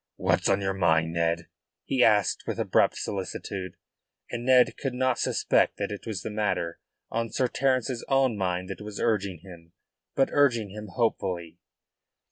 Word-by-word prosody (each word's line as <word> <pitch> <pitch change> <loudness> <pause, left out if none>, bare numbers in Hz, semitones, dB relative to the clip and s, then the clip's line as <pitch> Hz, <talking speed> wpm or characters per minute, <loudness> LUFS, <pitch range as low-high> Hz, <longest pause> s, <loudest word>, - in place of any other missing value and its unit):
"What's - - +1
on 100 0 +2
your 95 0 0
mind, 80 -3 +2
Ned?" 85 0 0 0.4
he 130 -2 +2
asked 105 -2 +3
with - - -2
abrupt - - +2
solicitude, 95 -1 -5 0.5
and 120 0 -4
Ned 125 0 +5
could 135 -3 -4
not 130 -1 +1
suspect - - +2
that 100 0 -3
it 105 +2 -7
was 100 -4 -4
the - - -4
matter 105 -5 -1 0.3
on 115 0 -1
Sir 130 - +1
Terence's 130 -1 0
own 135 -4 +3
mind 90 -2 -2
that 95 - -7
was 105 -1 -7
urging 100 -7 0
him 85 -3 -14 0.4
but 135 - +3
urging 120 -8 +2
him 105 +1 -8
hopefully. 90 -6 -2
105 Hz, 160 wpm, -27 LUFS, 90-120 Hz, 0.5 s, Ned